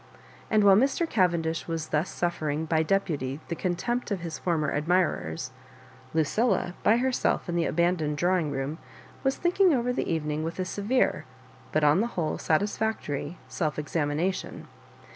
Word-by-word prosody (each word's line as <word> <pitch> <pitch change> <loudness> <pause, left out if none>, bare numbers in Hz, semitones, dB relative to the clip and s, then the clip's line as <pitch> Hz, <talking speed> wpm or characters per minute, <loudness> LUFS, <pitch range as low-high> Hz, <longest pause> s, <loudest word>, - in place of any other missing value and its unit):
And 215 -2 +4
while 200 -1 +7
Mr. 270 - +2
Cavendish 170 - +1
was 165 -2 -3
thus 155 +4 0
suffer 170 -3 -2
ing 150 +2 -1
by 160 0 +2
deputy 155 -7 -1
the 170 - -1
contempt 190 +10 -2
of 200 -4 -2
his 165 -2 -5
former 160 -5 0
admi 175 +5 +3
rers, 80 0 -5 0.6
Lucilla, 175 +4 +1
by 220 +3 +4
herself 255 -3 0
in 170 - -2
the 170 -1 +2
abandoned 160 -3 +1
draw 180 +4 +2
ing 155 -3 -2
room, 140 +3 -3 0.4
was 270 0 +1
thinking 355 -1 +3
over 250 0 0
the - - -2
evening 155 -1 -1
with 165 +1 -4
a 185 - -1
severe 205 +7 0 0.5
but 155 - +1
on 150 +6 +5
the 230 - +1
whole 160 -3 -1
satisfectoiy 175 -4 -1
self 155 -3 -2
exami 150 -1 -1
nation. 185 +4 -2
170 Hz, 165 wpm, -27 LUFS, 155-205 Hz, 0.6 s, while